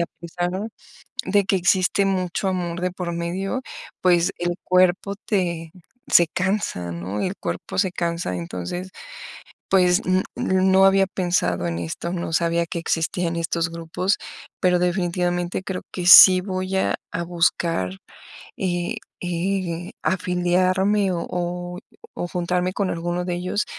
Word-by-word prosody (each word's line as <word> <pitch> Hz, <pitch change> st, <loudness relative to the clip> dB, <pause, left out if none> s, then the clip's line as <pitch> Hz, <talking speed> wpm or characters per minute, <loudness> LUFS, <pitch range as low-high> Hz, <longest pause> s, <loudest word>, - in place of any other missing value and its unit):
a 170 Hz, -, +1 dB
pesar 175 Hz, +1 st, -3 dB, 0.8 s
de 200 Hz, +1 st, +2 dB
que 195 Hz, -, +2 dB
existe 185 Hz, +2 st, +2 dB
mucho 190 Hz, 0 st, -1 dB
amor 175 Hz, -2 st, -3 dB
de 180 Hz, 0 st, 0 dB
por 175 Hz, -1 st, -4 dB
medio, 185 Hz, +8 st, -3 dB, 0.4 s
pues 180 Hz, 0 st, +3 dB
el 175 Hz, 0 st, -1 dB
cuerpo 185 Hz, +2 st, +2 dB
te 175 Hz, -6 st, -2 dB, 0.4 s
se 170 Hz, -, +6 dB
cansa, 180 Hz, -, -2 dB
¿no?, 90 Hz, +5 st, -4 dB
el 190 Hz, +2 st, -2 dB
cuerpo -, -, -5 dB
se 190 Hz, -1 st, +1 dB
cansa. 170 Hz, -, -2 dB
Entonces, 90 Hz, -, -5 dB, 0.8 s
pues, 180 Hz, 0 st, +4 dB
n 185 Hz, +1 st, +2 dB
no 190 Hz, 0 st, +3 dB
había 195 Hz, 0 st, +5 dB
pensado 175 Hz, -, 0 dB
en 85 Hz, -1 st, -3 dB
esto, 85 Hz, -, -4 dB
no 170 Hz, -2 st, -4 dB
sabía 170 Hz, 0 st, +1 dB
que 170 Hz, -, -4 dB
existían 165 Hz, +1 st, -1 dB
estos 170 Hz, 0 st, -1 dB
grupos, 170 Hz, +4 st, -1 dB, 0.4 s
pero 180 Hz, -1 st, +3 dB
definitivamente 175 Hz, 0 st, 0 dB
creo 190 Hz, -1 st, -5 dB
que 180 Hz, -1 st, -3 dB
sí 185 Hz, +1 st, +10 dB
voy 185 Hz, 0 st, -2 dB
a -, -, +1 dB, 0.2 s
a 170 Hz, -, -2 dB
buscar, 170 Hz, -, 0 dB, 0.7 s
eh 175 Hz, -2 st, -2 dB, 0.3 s
eh, 175 Hz, -1 st, -2 dB
afiliarme 185 Hz, +2 st, +1 dB
o 170 Hz, -, -3 dB
o 175 Hz, 0 st, -4 dB, 0.4 s
o 175 Hz, -, -3 dB
juntarme 180 Hz, +1 st, -1 dB
con 200 Hz, -1 st, -1 dB
alguno 175 Hz, +1 st, -2 dB
de 180 Hz, -, -2 dB
ellos, 180 Hz, +4 st, -1 dB
180 Hz, 140 wpm, -23 LUFS, 170-185 Hz, 0.8 s, sí